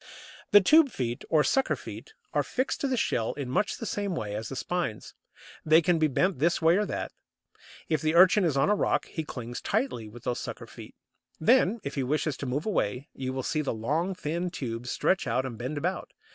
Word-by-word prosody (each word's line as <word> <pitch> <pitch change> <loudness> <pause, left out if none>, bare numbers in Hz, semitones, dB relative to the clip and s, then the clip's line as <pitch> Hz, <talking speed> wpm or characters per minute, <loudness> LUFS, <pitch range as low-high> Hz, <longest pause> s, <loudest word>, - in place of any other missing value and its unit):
The 205 -1 +8
tube 305 - +6
feet, 120 - -3
or 155 -2 +4
sucker 270 - +2
feet, 440 - -10 0.2
are - - +3
fixed 260 +5 -2
to 280 - +1
the 260 -1 0
shell 115 - 0
in 140 -4 -5
much 210 - 0
the 230 - -6
same 205 -4 -2
way 105 -8 -4
as 110 +2 -4
the 135 - -6
spines. 170 -5 -3 0.5
They 160 +1 +6
can 170 0 +2
be 155 - +4
bent 180 +4 0
this 170 +4 +2
way 165 +2 +4
or 210 0 0
that. - - -4 0.8
If 155 - 0
the 155 +1 +1
Urchin 185 +3 +6
is 155 -6 +1
on 135 - +3
a - - +4
rock - - +1
he 160 - -5
clings 120 -5 -6
tightly 200 - -1
with 120 +2 -13
these 120 - -2
sucker - - -6
feet; - - -12 0.4
then, 230 +2 +3
if 140 - -4
he 140 - -1
wishes 150 +2 0
to 140 - -5
move 140 +5 -2
away, 135 - -1
you 130 -1 -4
will 130 0 -3
see 155 - 0
the 140 -5 -2
long 155 - -1
thin 170 +1 -2
tubes 125 -7 -5
stretch 190 -7 +1
out 125 +3 0
and 125 -3 -5
bend 125 +6 -4
about. 180 +6 -3
155 Hz, 220 wpm, -28 LUFS, 125-185 Hz, 0.8 s, The